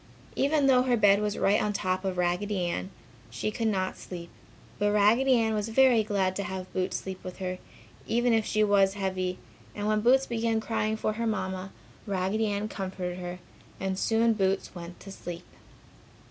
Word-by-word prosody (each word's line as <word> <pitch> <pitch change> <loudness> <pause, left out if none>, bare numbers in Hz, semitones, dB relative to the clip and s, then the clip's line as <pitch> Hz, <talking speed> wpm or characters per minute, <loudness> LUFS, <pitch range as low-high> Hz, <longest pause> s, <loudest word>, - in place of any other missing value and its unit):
Even 285 +1 +2
though 260 -2 +5
her 250 -1 +2
bed 205 -1 +5
was 210 0 -1
right 200 +2 +3
on 210 - 0
top 185 -1 -1
of 190 -2 -2
Raggedy 180 +2 0
Ann, 95 - -3 0.4
she 120 - -3
could 225 +1 -1
not 190 -3 -1
sleep. 170 -2 -8 0.5
But 205 0 +2
Raggedy 230 +6 +4
Ann 225 -2 +2
was 210 +1 -1
very 250 -1 +5
glad 195 -3 0
to 200 - -2
have 190 -1 -6
Boots 185 0 -1
sleep 190 -1 -7
with 185 -1 -7
her, 185 -1 -4 0.5
even 240 +1 +2
if 225 -1 +3
she 215 0 +1
was 200 -1 +3
heavy, 185 -2 -2 0.4
and 205 - -3
when 215 0 +2
Boots 260 +4 +4
began 230 -2 0
crying 220 -1 -1
for 215 - -1
her 230 +1 -2
Mamma, 190 -3 -3 0.4
Raggedy 200 +3 0
Ann 205 +1 -1
comforted 185 -3 -5
her 180 0 -5 0.4
and 190 0 -2
soon 225 0 +3
Boots 195 -2 0
went 175 -1 -9
to 195 - -9
sleep. 175 -2 -7
200 Hz, 185 wpm, -28 LUFS, 185-220 Hz, 0.5 s, though